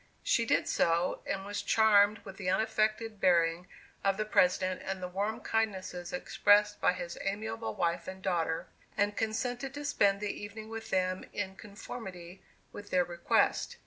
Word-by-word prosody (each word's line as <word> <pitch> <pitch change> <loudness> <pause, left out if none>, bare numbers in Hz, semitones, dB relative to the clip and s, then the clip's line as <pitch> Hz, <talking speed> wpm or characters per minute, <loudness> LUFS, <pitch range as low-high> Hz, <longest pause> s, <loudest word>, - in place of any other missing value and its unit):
She - - +2
did - - +2
so, 170 +2 +1
and 195 0 -2
was 205 0 -3
charmed 215 -1 +4
with 195 -1 -9
the 185 -3 -2
unaffected 215 +2 0
bearing 170 0 +3 0.4
of 195 -1 +2
the 215 - -1
President, 185 -2 +2
and 190 0 -3
the 180 - -4
warm 200 +4 -2
kindnesses 190 -5 -2
expressed 205 +3 +3
by - - +4
his 175 -1 -6
amiable 220 +3 -3
wife 170 -3 -1
and 190 0 -6
daughter, 170 -4 -1 0.3
and 205 0 +1
consented 245 +5 -2
to 290 0 -5
spend 200 -8 +3
the 210 0 -2
evening 215 +1 -8
with 225 0 -7
them 185 0 0
in 190 -2 -3
conformity 195 -4 -9 0.3
with 205 0 -10
their 180 -1 +3
request. 175 0 +1
200 Hz, 160 wpm, -31 LUFS, 185-215 Hz, 0.4 s, charmed